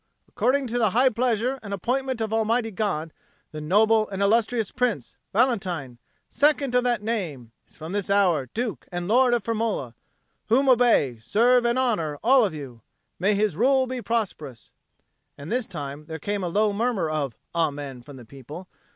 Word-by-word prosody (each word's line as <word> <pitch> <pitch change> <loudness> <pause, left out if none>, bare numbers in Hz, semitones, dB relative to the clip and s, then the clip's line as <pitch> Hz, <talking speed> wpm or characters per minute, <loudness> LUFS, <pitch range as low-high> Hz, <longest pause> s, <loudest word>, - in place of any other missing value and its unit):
According 275 +2 +1
to 240 0 -2
the 220 -3 +3
high 260 +1 +5
pleasure 245 +2 0
and 200 -2 -4
appointment 255 +4 -2
of 220 0 -2
Almighty 225 +1 +1
God, 165 -6 -2 0.4
the 155 - -7
noble 215 +7 +3
and 195 -1 -5
illustrious 225 +1 +1
Prince, 235 - -2 0.2
Valentine, 185 - 0 0.3
Second 285 -3 +1
of 250 0 +3
that 240 -4 0
Name, 165 - -4 0.2
is - - -18
from 160 +2 -8
this 200 -1 -2
hour 180 -9 +2
Duke 230 -2 -4
and 175 0 -4
Lord 245 +3 +4
of 235 - -2
Firmola; 220 - -2 0.6
whom 265 +5 +3
obey, 235 - +3
serve, 240 - +3
and 235 +1 +1
honour, 175 - 0
all 255 +2 +5
of 195 -7 -1
you. 130 -6 -9 0.4
May 200 +4 +2
his 205 -4 +1
rule 260 - +3
be 255 -1 -5
prosperous!" 190 - -4 0.7
And 145 +2 -8
this 245 -1 -1
time 145 -2 -7
there 160 0 -6
came 200 +5 -3
a - - -1
low 210 +3 +1
murmur 215 -5 0
of 145 -6 -2 0.2
"Amen" 145 -6 -2
from 140 +3 -12
the 125 -3 -12
people. 140 +9 -10
210 Hz, 175 wpm, -25 LUFS, 155-240 Hz, 0.7 s, high